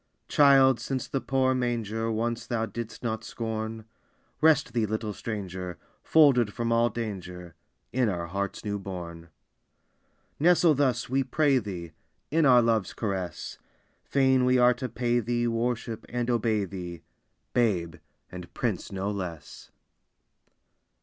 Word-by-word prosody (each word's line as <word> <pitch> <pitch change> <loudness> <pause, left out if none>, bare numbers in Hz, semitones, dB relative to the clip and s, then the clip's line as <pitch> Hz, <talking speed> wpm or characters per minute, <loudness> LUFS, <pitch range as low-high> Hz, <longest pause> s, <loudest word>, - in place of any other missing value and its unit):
Child, 135 -3 +5
since 130 +2 -3
the 135 - -2
poor 130 +1 +1
manger 115 -3 -1
Once 115 +2 -2
thou 115 -2 -1
didst 115 +1 -7
not 110 -2 -2
scorn, 110 -1 -4 0.6
Rest 150 -6 +4
thee, 115 -3 +1
little 110 0 -3
Stranger, 95 -5 -5 0.2
Folded 135 -9 +4
from 115 -1 -2
all 115 +1 +3
danger, 90 -6 -6 0.4
In 125 -3 +2
our 85 -3 -2
hearts 100 +4 -4
new 100 -1 -2
born! 85 -3 -7 1.1
Nestle 170 0 +5
thus, 135 -3 +1
we 135 +2 +1
pray 135 +1 +2
thee, 90 -7 -6 0.4
In 160 -1 +4
our 125 -2 +6
love's 115 -4 0
caress; 95 -5 -4 0.4
Fain 130 -2 +3
we 125 0 +4
are 125 0 +5
to 130 0 -5
pay 120 0 0
thee 120 +1 -1
Worship, 115 -1 -2
and 120 0 -1
obey 110 -3 +1
thee, 90 -3 -7 0.5
Babe, 90 -8 +1 0.3
and 90 -1 -9
Prince - - -2
no 100 +1 -2
less! 90 -6 -7
115 Hz, 135 wpm, -27 LUFS, 100-125 Hz, 1.1 s, our